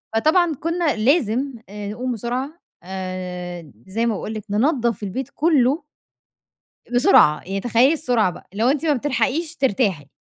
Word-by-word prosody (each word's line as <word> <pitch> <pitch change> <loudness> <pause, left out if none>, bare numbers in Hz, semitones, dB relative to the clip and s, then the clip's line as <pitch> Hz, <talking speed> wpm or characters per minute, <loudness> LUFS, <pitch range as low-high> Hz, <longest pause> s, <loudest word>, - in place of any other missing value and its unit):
فطبعًا 315 +6 +3
كنا 335 -1 0
لازم 260 +2 +1 0.2
آآ 205 0 -6
نقوم 250 +4 -3
بسرعة 255 - -4 0.2
آآ، 180 -3 -6 0.2
زي 225 +5 -1
ما 230 - +1
باقول 215 - -5
لِك، 215 -2 -6
ننضف 235 - +1
البيت 240 +7 -4
كله. 295 -1 +2 1.1
بسرعة، 150 -10 +6
يعني 195 +1 -3
تخيَّلي 245 +6 +3
السرعة 240 - +1
بقى، - - -13
اللي 215 - -1
هو 240 - +4
أنتِ 295 +3 0
ما 300 - +3
بتلحقيش 290 +5 -1
ترتاحي. 200 - 0
240 Hz, 145 wpm, -21 LUFS, 200-285 Hz, 1.1 s, بسرعة